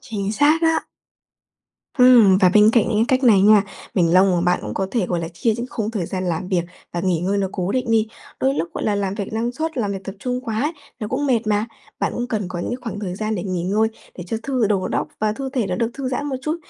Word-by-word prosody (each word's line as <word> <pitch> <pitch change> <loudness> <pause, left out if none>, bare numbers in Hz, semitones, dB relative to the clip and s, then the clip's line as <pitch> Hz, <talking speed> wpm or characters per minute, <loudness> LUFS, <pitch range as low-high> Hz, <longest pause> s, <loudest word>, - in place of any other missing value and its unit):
Chính 205 -2 -4
xác 300 +7 +3
á. 325 0 +2 1.2
Ừm, 235 -7 +7
và 185 -2 +5
bên 210 +1 +7
cạnh 230 -4 +3
những 220 - 0
cái 260 - +3
cách 265 - -3
này 210 -5 +6
nha, 210 -1 +6 0.3
mình 170 -2 +2
mong 190 +1 +6
mà 175 - +1
bạn 180 0 +2
cũng - - -5
có 190 - -1
thể, 225 -7 0
gọi 175 -2 -1
là, 165 - -4
chia 200 +7 0
những 240 +1 -4
khung 220 -1 -3
thời 195 -7 -3
gian 185 -1 -3
làm 175 +1 -2
việc 180 -3 +1 0.3
và 175 - -2
nghỉ 175 -2 0
ngơi 195 +3 0
nó 195 -1 0
cố 185 +1 -2
định 250 -3 -1
đi. 225 -1 +3 0.3
Đôi 270 +1 +2
lúc, 170 - -2
gọi - - -3
là, 210 - +1
làm 195 -1 -1
việc 205 0 -5
năng 230 +2 -1
suất, 320 +3 -4
làm 205 -3 -1
việc 195 -1 -6
tập 195 - -6
trung 250 +1 -3
quá 250 +7 -2 0.3
nó 210 - -3
cũng 285 +3 -1
mệt 245 -5 +3
mà. 210 +1 +1 0.3
Bạn - - 0
cũng 240 - -2
cần 215 -4 -2
có 180 - -5
những 245 +8 -4
khoảng 220 -4 -5
thời 185 -4 -4
gian 215 +2 -2
để 180 - -3
nghỉ 185 -3 -2
ngơi, 210 +4 +1 0.3
để 175 - -5
cho 225 - -2
thư 255 -5 0
đầu 195 -3 0
óc - - -1
và 215 0 +1
thư 270 +4 -5
thể 250 -6 -1
nó 180 - -2
được 230 +4 0
thư 270 -2 -3
giãn 275 +3 -2
một 270 -2 -2
chút. 310 +3 -1
215 Hz, 275 wpm, -21 LUFS, 190-245 Hz, 1.2 s, Ừm